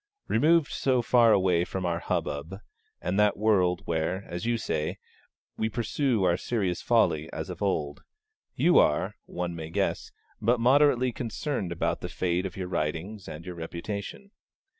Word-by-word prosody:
Removed 155 +5 +3
so 130 -3 +1
far 120 -1 +5
away 90 -4 +3
from 95 +1 -4
our 85 -1 0
hubbub, 75 +5 -3 0.5
and 90 +4 0
that 105 -1 +3
world 95 -5 +2
where, 85 +4 -1
as 85 +6 -5
you 120 0 +2
say, 75 -8 -2 0.6
we 110 - 0
'pursue 120 0 0
our 90 -1 +3
serious 95 -5 -1
folly 80 +1 +2
as - - -5
of - - -9
old,' 75 -8 -1 0.5
you 170 +7 +5
are, 75 - +2
one 85 -1 -4
may 80 -1 -6
guess, 100 +3 -1 0.3
but 120 +3 +2
moderately 130 0 +4
concerned 115 - -3
about 85 - -1
the - - -5
fate 90 +1 -1
of 95 - -11
your 95 -1 -3
writings 90 +5 -3
and 80 +2 -8
your 90 - -5
reputation. 100 - -6
95 Hz, 160 wpm, -27 LUFS, 85-115 Hz, 0.6 s, far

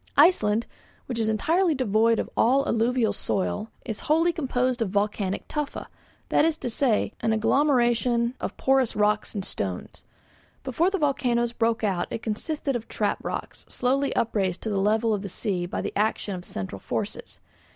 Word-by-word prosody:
Iceland, 235 - +5 0.4
which 245 -3 -4
is 220 -1 +1
entirely 325 - +2
devoid 230 -2 +3
of - - -1
alluvial 240 -2 +2
soil, 205 +3 -2 0.2
is 220 -4 -4
wholly 330 +3 +4
composed 255 -5 0
of 220 - +1
volcanic 200 -1 -1
tufa, 300 -2 -4 0.4
that - - +4
is 320 0 +2
to 245 - -4
say, 220 -4 +1
an 225 0 +1
agglomeration 240 0 +2
of - - -4
porous 265 -3 +2
rocks 210 +1 +1
and 195 -2 -3
stones. 95 -2 -4 0.6
Before 275 +7 +1
the 390 - -1
volcanoes 245 -6 +1
broke 230 -1 0
out 190 -4 0
it 225 - -5
consisted 275 +5 -2
of 230 -2 -4
trap - - -1
rocks - - -5
slowly 270 +3 0
upraised 195 -6 0
to 220 - -2
the 200 - 0
level 220 +2 +2
of 205 - -1
the 200 - -6
sea 185 -3 -2
by - - -3
the - - -4
action 210 -1 0
of 180 -1 -7
central 95 0 -6
forces. - - -5
230 Hz, 165 wpm, -26 LUFS, 210-265 Hz, 0.6 s, Iceland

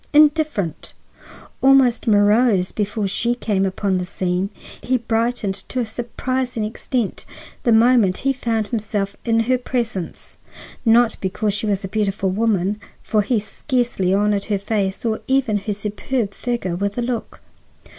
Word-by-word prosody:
Indifferent, 295 - +2 0.7
almost 265 -4 +4
morose 205 -2 +4
before 210 0 -2
she 235 +5 0
came 200 -5 0
upon 190 0 -1
the - - -2
scene, 180 +1 -2 0.3
he 255 +1 +1
brightened 230 -3 -1
to 200 +6 -5
a 245 - 0
surprising 240 +1 -3
extent 230 0 -3 0.4
the 235 - +2
moment 225 -4 +5
he 275 - +3
found 225 -5 -1
himself 205 -3 -2
in 230 -1 +3
her 250 +2 +1
presence. 235 -8 -4 0.5
Not 235 +1 +4
because 200 +2 -1
she 210 +2 -2
was 200 -1 0
a - - -3
beautiful 195 -1 -1
woman, 205 -1 0 0.2
for 215 - +2
he 230 +4 +1
scarcely 235 -3 -1
honored 205 0 +2
her 205 -2 0
face 200 0 -2
or 220 -1 0
even 265 -5 +2
her 205 +1 -3
superb 210 +2 -2
figure 235 -8 -2
with 200 +3 -2
a 240 - 0
look. 235 -2 -4
215 Hz, 145 wpm, -21 LUFS, 200-240 Hz, 0.7 s, moment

